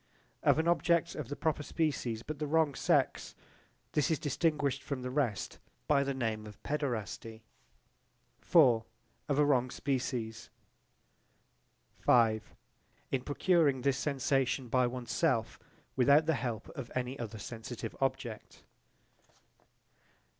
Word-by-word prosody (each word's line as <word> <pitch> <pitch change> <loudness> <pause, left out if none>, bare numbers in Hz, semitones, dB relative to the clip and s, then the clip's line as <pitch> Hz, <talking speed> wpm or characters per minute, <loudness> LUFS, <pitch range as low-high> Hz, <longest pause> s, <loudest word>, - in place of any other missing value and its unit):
Of - - +4
an 160 +1 +1
object 170 0 +2
of 150 -6 -5
the 145 - -3
proper 155 -1 -1
species 140 -8 -2
but 155 -1 -6
the 150 - -2
wrong 155 -1 +2
sex. 125 - +1 0.6
This 150 +1 +1
is 160 - +2
distinguished 145 -2 0
from 140 -4 -4
the 125 - -3
rest 125 -8 -1 0.3
by 140 - +4
the 140 -1 -2
name 110 -4 -2
of 105 -1 -11
paederasty. 115 -5 -3 1.1
Of 125 -10 +6 0.5
a 145 +1 +3
wrong 130 -3 +2
species. 125 -5 -3 1.6
In 115 +2 0
procuring 145 -2 +2
this 135 0 +1
sensation 135 -3 0
by 125 +1 +3
one's 120 -1 -5
self - - 0 0.4
without 140 +4 +5
the 160 - +2
help 120 -6 -3
of 130 -4 -8
any 130 +2 -2
other 110 -2 -5
sensitive 115 +1 -7
object. 130 -5 -3
135 Hz, 120 wpm, -32 LUFS, 120-145 Hz, 1.6 s, Of